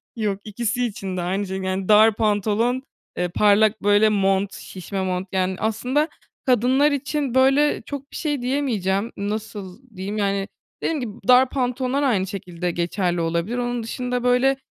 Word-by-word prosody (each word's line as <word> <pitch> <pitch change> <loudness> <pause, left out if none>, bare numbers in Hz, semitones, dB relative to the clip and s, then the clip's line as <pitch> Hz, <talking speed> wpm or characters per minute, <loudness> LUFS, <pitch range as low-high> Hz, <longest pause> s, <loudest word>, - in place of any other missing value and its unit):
Yok, 210 -4 -1
ikisi 230 +3 -1
için 195 -4 -5
de - - -1
aynı 190 +3 -2
şey, 190 +1 -4
yani, 190 0 -2
dar 215 0 +6
pantolon, 220 +4 +1 0.4
eee, 180 - 0
parlak, 210 0 +4
böyle, 205 +1 +5
mont, 195 -1 +1
şişme 190 +1 -6
mont, 185 0 -2
yani, 185 0 0
aslında 250 +8 0 0.4
kadınlar 260 +4 +3
için 285 -2 -2
böyle 270 +3 +4
çok 280 -1 -8
bir - - -11
şey 295 -5 -2
diyemeyeceğim. 230 -6 -1
Nasıl 205 0 -5
diyeyim, 195 +3 -4
yani, 200 -1 0 0.3
dediğim 320 -3 -1
gibi 235 -4 -4 0.2
dar 255 +1 +6
pantolonlar 255 +1 -1
aynı 205 -9 +1
şekilde 180 -2 -4
geçerli 175 0 -1
olabilir. 170 +8 -1
Onun 245 -1 -2
dışında, 250 +2 -3
böyle, 250 +2 +3
215 Hz, 155 wpm, -22 LUFS, 195-250 Hz, 0.4 s, dar